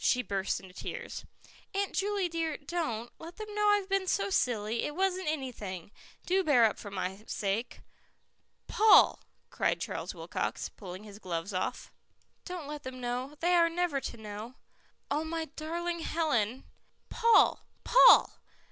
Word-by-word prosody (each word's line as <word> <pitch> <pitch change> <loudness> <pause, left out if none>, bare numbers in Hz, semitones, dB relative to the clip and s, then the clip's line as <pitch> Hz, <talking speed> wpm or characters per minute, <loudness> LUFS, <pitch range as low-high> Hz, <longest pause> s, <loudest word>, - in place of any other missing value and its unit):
She 250 -1 +3
burst 195 -3 -1
into 185 -2 -14
tears. - - -6 0.5
"Aunt 400 0 -1
Juley 400 -1 0
dear, 330 -2 -2
don't. 285 - -27
Don't 240 -10 -2
let 330 +2 -10
them 430 -1 -7
know 420 0 +2
I've 410 -2 +3
been 390 -1 0
so 395 +1 0
silly. 230 - 0
It 295 - -3
wasn't 375 -1 0
anything. 220 - -4 0.3
Do 380 +1 +2
bear 255 -8 +5
up 215 - 0
for 205 - -7
my 190 +1 -4
sake." 205 +4 -2 0.8
"Paul," 435 0 +6 0.3
cried - - 0
Charles - - -4
Wilcox, - - -3
pulling 185 0 -9
his 205 -1 -11
gloves 180 +1 -4
off. 185 - -3 0.5
"Don't 360 -4 -6
let 295 0 -6
them 255 -1 -7
know. 250 +3 -3
They 350 +1 +3
are 340 -1 +5
never 335 -5 -1
to 235 - -6
know." 215 +3 -8 0.6
"Oh, 295 +2 +1
my 325 0 -3
darling 340 +2 -3
Helen 270 -8 0 0.2
" - - -43
"Paul! 465 -1 +4 0.2
Paul!" - - +7
295 Hz, 155 wpm, -30 LUFS, 215-355 Hz, 0.8 s, Paul